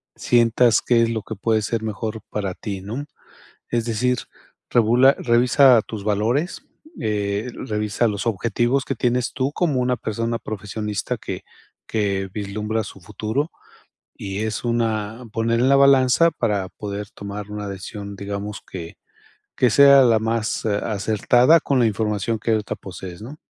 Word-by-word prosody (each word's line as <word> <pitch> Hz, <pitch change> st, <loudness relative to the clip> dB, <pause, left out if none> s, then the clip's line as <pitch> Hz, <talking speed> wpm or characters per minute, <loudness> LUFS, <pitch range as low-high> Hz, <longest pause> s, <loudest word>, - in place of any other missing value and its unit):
sientas 120 Hz, -1 st, +3 dB
qué 120 Hz, -1 st, +3 dB
es 115 Hz, -, +1 dB
lo 110 Hz, -1 st, -2 dB
que 110 Hz, -, -6 dB
puede 110 Hz, +2 st, +1 dB
ser 115 Hz, +1 st, -2 dB
mejor 110 Hz, +1 st, -4 dB
para 100 Hz, -3 st, -3 dB
ti, 100 Hz, -4 st, -5 dB
¿no?, 115 Hz, +9 st, -5 dB, 0.6 s
es 120 Hz, -1 st, 0 dB
decir, 125 Hz, +2 st, 0 dB, 0.5 s
regula 120 Hz, +4 st, +5 dB
revisa 125 Hz, 0 st, +5 dB
tus 105 Hz, -3 st, -7 dB
valores, 110 Hz, -, 0 dB, 0.4 s
eh, 105 Hz, +1 st, -1 dB, 0.2 s
revisa 105 Hz, +1 st, 0 dB
los 100 Hz, -3 st, -3 dB
objetivos 120 Hz, +5 st, 0 dB
que 135 Hz, -, -2 dB
tienes 125 Hz, +1 st, 0 dB
tú 130 Hz, +1 st, -1 dB
como 150 Hz, -7 st, 0 dB
una 125 Hz, 0 st, +1 dB
persona 115 Hz, +1 st, -2 dB
profesionista 105 Hz, 0 st, -4 dB
que -, -, -6 dB, 0.4 s
que 100 Hz, -3 st, -1 dB
vislumbra 105 Hz, +2 st, -3 dB
su 95 Hz, -, -10 dB
futuro, 110 Hz, -, -3 dB, 0.7 s
y 95 Hz, 0 st, -5 dB
es 110 Hz, +1 st, -3 dB
una 115 Hz, -1 st, -1 dB
poner 115 Hz, +1 st, +1 dB
en 130 Hz, -, +3 dB
la 140 Hz, -, +6 dB
balanza 140 Hz, +3 st, +5 dB
para 100 Hz, -5 st, -1 dB
poder 100 Hz, 0 st, -6 dB
tomar 100 Hz, 0 st, -7 dB
una 105 Hz, -1 st, -5 dB
decisión 100 Hz, +1 st, -7 dB
digamos, 100 Hz, +1 st, -5 dB
que 85 Hz, -3 st, -7 dB, 0.6 s
que 125 Hz, -, +4 dB
sea 140 Hz, +2 st, +8 dB
la 115 Hz, -3 st, +4 dB
más, 115 Hz, 0 st, -1 dB
eh, 105 Hz, -2 st, +1 dB
acertada 115 Hz, +8 st, +3 dB
con 135 Hz, -2 st, +1 dB
la 120 Hz, -, +4 dB
información 105 Hz, +1 st, -1 dB
que 115 Hz, -, -1 dB
ahorita 110 Hz, -1 st, -1 dB
posees, 95 Hz, -1 st, -9 dB
¿no? 135 Hz, +8 st, -9 dB
110 Hz, 155 wpm, -22 LUFS, 105-120 Hz, 0.7 s, sea